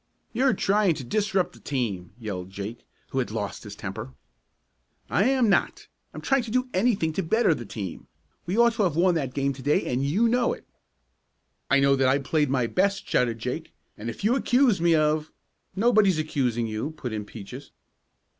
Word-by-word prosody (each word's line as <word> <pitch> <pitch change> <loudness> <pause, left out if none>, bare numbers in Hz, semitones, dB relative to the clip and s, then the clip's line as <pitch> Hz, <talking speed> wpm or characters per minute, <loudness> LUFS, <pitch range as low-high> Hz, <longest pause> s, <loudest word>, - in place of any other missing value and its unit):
"You're 255 -1 +2
trying 200 -3 +2
to 135 - -6
disrupt 195 - 0
the - - -16
team!" 105 -10 -3
yelled 95 -6 -5
Jake, 100 +4 -7 0.2
who 135 - 0
had 125 - -1
lost 105 -2 -4
his 105 -1 -9
temper. 110 +6 -7 1.0
"I 195 - +3
am 260 -2 +3
not! 200 - +1 0.3
I'm - - -8
trying 270 -1 +2
to 235 - -7
do 255 +3 0
anything 190 -5 +1
to 190 - -1
better 190 +2 +3
the 120 -7 -7
team. 95 -6 -6 0.4
We 185 +5 -1
ought 235 0 +5
to 225 - -1
have 170 -5 0
won 180 +2 +4
that 135 -6 -2
game 140 0 0
to 135 - -11
day, 145 +3 +1
and 125 +2 -1
you 185 +12 +2
know 240 +1 +2
it." - - -12 1.0
"I 140 - +5
know 140 0 +4
that 135 -1 +2
I 130 +2 +4
played 145 +1 0
my 130 -3 +1
best!" 195 +10 0
shouted 120 -2 +1
Jake, 125 +8 -5 0.2
"and 110 +3 -6
if 115 - -8
you 225 +5 +3
accuse 250 -7 +3
me 170 -1 +4
of 155 0 +1 0.2
" - - -50
"Nobody's 205 -4 +4
accusing 130 -7 0
you," 110 +5 -3
put 125 -3 -5
in 105 -1 -3
Peaches. 115 +6 -10
150 Hz, 195 wpm, -26 LUFS, 120-200 Hz, 1.0 s, ought